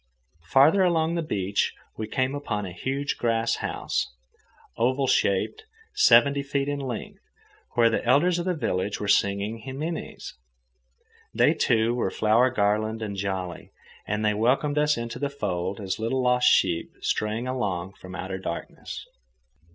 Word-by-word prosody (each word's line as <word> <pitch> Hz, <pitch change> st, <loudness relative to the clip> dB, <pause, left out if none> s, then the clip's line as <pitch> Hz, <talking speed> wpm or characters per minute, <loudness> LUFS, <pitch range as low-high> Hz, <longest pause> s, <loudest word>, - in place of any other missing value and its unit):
Farther 155 Hz, +9 st, +5 dB
along 165 Hz, -2 st, +2 dB
the 170 Hz, -, 0 dB
beach 100 Hz, -, -1 dB, 0.2 s
we 110 Hz, -, -4 dB
came 130 Hz, +4 st, 0 dB
upon 105 Hz, -8 st, -3 dB
a 90 Hz, -, -6 dB
huge 135 Hz, +9 st, -3 dB
grass 115 Hz, -1 st, +1 dB
house, -, -, -2 dB, 0.6 s
oval 130 Hz, +4 st, +1 dB
shaped 130 Hz, -, +1 dB, 0.3 s
seventy 140 Hz, +4 st, +5 dB
feet 140 Hz, 0 st, -2 dB
in 145 Hz, 0 st, -2 dB
length, 130 Hz, -5 st, -5 dB, 0.6 s
where 120 Hz, -1 st, +5 dB
the -, -, 0 dB
elders 170 Hz, +8 st, +3 dB
of 175 Hz, -, -3 dB
the 180 Hz, -1 st, 0 dB
village 105 Hz, -, -2 dB
were 105 Hz, -, -3 dB
singing 100 Hz, +2 st, +1 dB
himines. 145 Hz, +7 st, -5 dB, 1.0 s
They, -, -, +4 dB
too, 115 Hz, +1 st, +2 dB
were 120 Hz, -5 st, 0 dB
flower 110 Hz, +6 st, +3 dB
garlanded 110 Hz, -1 st, 0 dB
and 100 Hz, -1 st, -5 dB
jolly, 95 Hz, -2 st, -4 dB, 0.3 s
and 105 Hz, +1 st, -1 dB
they 105 Hz, -, +3 dB
welcomed 135 Hz, +7 st, +1 dB
us 150 Hz, 0 st, +2 dB
into 115 Hz, 0 st, -5 dB
the 140 Hz, -, -1 dB
fold 95 Hz, -9 st, -3 dB
as 95 Hz, -1 st, -3 dB
little 125 Hz, +4 st, 0 dB
lost 125 Hz, 0 st, +3 dB
sheep 85 Hz, -3 st, +2 dB
straying 110 Hz, +3 st, -1 dB
along 95 Hz, -8 st, -2 dB
from 95 Hz, -1 st, -11 dB
outer 95 Hz, 0 st, -5 dB
darkness. 85 Hz, -2 st, -6 dB
115 Hz, 150 wpm, -26 LUFS, 100-140 Hz, 1.0 s, Farther